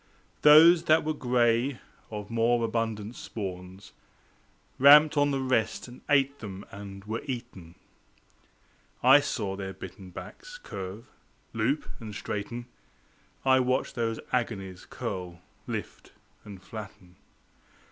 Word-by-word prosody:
Those 165 +3 +8
that 155 0 +4
were 155 +1 -1
gray, 125 -1 +1 0.3
of 105 0 -7
more 115 +1 +2
abundant 110 -1 -3
spawns, 95 -3 -7 0.9
Ramped 150 +3 +8
on 145 0 +3
the 135 -1 -1
rest 130 -4 0
and 125 +1 -13
ate 140 -1 +3
them 100 -2 -8
and 100 0 -9
were 110 +2 -3
eaten. 120 - -7 1.3
I 135 +3 +8
saw 105 -9 -3
their 95 -1 -6
bitten 95 0 -10
backs - - -10
curve, 100 - -7 0.5
loop, 115 +7 0
and 110 -3 -8
straighten, 115 +4 -5 0.8
I 130 0 +5
watched 130 +1 0
those 115 -2 -2
agonies 100 -7 -3
curl, 90 -2 -5 0.3
lift, - - -6 0.3
and 100 -3 -11
flatten. 95 -3 -10
115 Hz, 115 wpm, -28 LUFS, 100-130 Hz, 1.3 s, Those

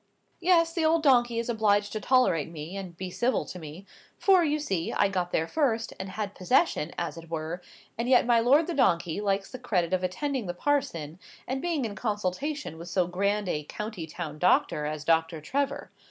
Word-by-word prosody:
"Yes, 335 -2 +3
the 335 - 0
old 320 0 +3
donkey 240 -4 +4
is 230 - -1
obliged 210 -3 +2
to 215 - -2
tolerate 200 - +3
me, 165 +2 -7
and 185 -4 -7
be 185 0 -5
civil 245 +7 0
to 180 - -8
me; 160 +4 -9 0.3
for, 380 -3 +5
you 300 -1 +1
see, 195 - -2
I 205 - +3
got 180 -2 -2
there 160 - 0
first, 230 - 0
and 190 0 -5
had 205 0 -4
possession, 185 - +1
as 170 -1 -3
it 165 0 -13
were, 165 +2 -4 0.4
and 240 +2 -1
yet 255 -2 +5
my 235 -1 +4
lord 275 +8 +4
the 345 - -3
donkey 170 - +2
likes 195 -1 -1
the 255 - -7
credit 185 -8 0
of 185 0 +1
attending 250 +5 -2
the 175 - -3
parson, 175 - -1 0.3
and 265 +1 -2
being 330 -7 -1
in 215 - -4
consultation 210 - -3
with 170 +2 -8
so 180 0 +2
grand 200 +3 0
a 150 -4 -1
county 210 -2 -6
town 155 -2 -6
doctor 150 -3 +2
as 150 -1 -4
Doctor 160 0 +2
Trevor. 275 - -2
200 Hz, 200 wpm, -28 LUFS, 170-260 Hz, 0.4 s, for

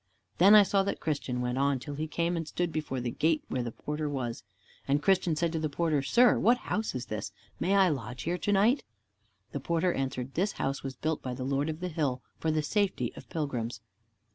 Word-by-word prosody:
Then 200 +4 +8
I 210 - +9
saw 195 0 +2
that 200 - -2
Christian 135 -5 -2
went 125 +1 -1
on 140 0 +2
till 145 +3 -7
he 155 +2 -3
came 170 +2 0
and 165 -2 -3
stood 175 +2 -1
before 150 -4 -3
the 120 -1 -2
gate 155 +3 +1
where 130 - -1
the 120 -1 -3
porter 150 +4 -4
was. 125 -4 -3 0.4
And 140 +1 +3
Christian 180 0 +2
said 170 +1 0
to 165 - -2
the 155 -1 -1
porter, 155 -1 +1
"Sir, 240 - +4
what 240 +3 +4
house 220 - -2
is 125 -1 -3
this? 105 -1 -4 0.3
May 195 +2 +2
I 190 -2 +5
lodge 125 -4 -4
here 175 +2 -1
to 205 - 0
night?" 215 +7 +4 0.7
The 140 - -3
porter 170 +5 +1
answered, 135 -1 -3
"This 195 +4 0
house 135 +1 -2
was 135 -1 -5
built 155 0 -2
by 125 -1 -4
the 130 - -5
Lord 140 +3 0
of 155 +2 -5
the 180 - -1
hill, 145 -7 -1 0.2
for 160 - 0
the 155 -1 +1
safety 200 +4 0
of - - -12
pilgrims." 125 - -3
155 Hz, 225 wpm, -29 LUFS, 135-175 Hz, 0.7 s, I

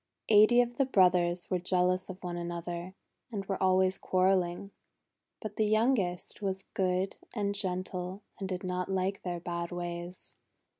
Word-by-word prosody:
Eighty 215 +3 +7
of 240 0 -3
the 275 - +3
brothers 180 -5 +3
were 180 - +2
jealous 180 +1 +1
of 185 0 -8
one 175 -1 -3
another, 175 +1 -5 0.4
and 200 -3 -4
were 195 -1 -3
always 185 0 +3
quarrel 185 +1 +3
ling. 175 +3 -5 0.7
But 215 -2 -7
the 220 - +3
youngest 215 -5 +1
was 190 -1 -1
good 185 0 0 0.2
and 200 -2 0
gentle 185 -1 -3 0.2
and 190 -1 -4
did 185 -1 -3
not 180 0 -2
like 190 +1 -1
their 175 -2 -3
bad 170 0 -4
ways. 175 0 -6
185 Hz, 155 wpm, -31 LUFS, 180-195 Hz, 0.7 s, Eighty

